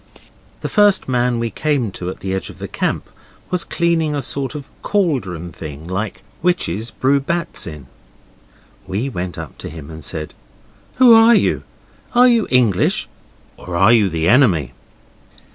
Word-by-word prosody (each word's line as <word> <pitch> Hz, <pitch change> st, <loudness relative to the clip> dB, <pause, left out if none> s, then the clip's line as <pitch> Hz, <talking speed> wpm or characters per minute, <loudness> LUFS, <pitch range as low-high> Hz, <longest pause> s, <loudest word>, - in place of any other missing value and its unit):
The -, -, -2 dB
first 205 Hz, -2 st, +3 dB
man 125 Hz, -1 st, +1 dB
we 115 Hz, -1 st, -2 dB
came 140 Hz, -8 st, 0 dB
to 90 Hz, -1 st, -5 dB
at -, -, -8 dB
the 95 Hz, -1 st, -3 dB
edge 95 Hz, -, -3 dB
of -, -, -12 dB
the -, -, -6 dB
camp -, -, -2 dB, 0.4 s
was 180 Hz, -1 st, 0 dB
cleaning 165 Hz, -3 st, 0 dB
a 145 Hz, -, -1 dB
sort 135 Hz, +2 st, -3 dB
of 145 Hz, -2 st, -6 dB, 0.2 s
cauldron 110 Hz, -, -1 dB
thing 75 Hz, -1 st, -9 dB
like 95 Hz, +4 st, -4 dB, 0.2 s
witches 115 Hz, -, 0 dB
brew 135 Hz, +4 st, +1 dB
bats 170 Hz, -, -3 dB
in. 75 Hz, -5 st, -8 dB, 1.0 s
We 110 Hz, +9 st, -2 dB
went 90 Hz, -6 st, -5 dB
up 80 Hz, -4 st, -8 dB
to -, -, -6 dB
him 80 Hz, -1 st, -9 dB
and 80 Hz, -1 st, -9 dB
said, 75 Hz, +2 st, -5 dB, 0.6 s
'Who 250 Hz, -3 st, +7 dB
are 225 Hz, +1 st, +7 dB
you? -, -, +2 dB, 0.5 s
Are 250 Hz, +1 st, +7 dB
you 235 Hz, -3 st, +3 dB
English, 120 Hz, -7 st, +2 dB, 0.5 s
or 90 Hz, -, -7 dB
are 95 Hz, +6 st, +6 dB
you 105 Hz, -4 st, +4 dB
the 80 Hz, -1 st, -1 dB
enemy? 90 Hz, -, +3 dB
120 Hz, 160 wpm, -19 LUFS, -, 1.0 s, Who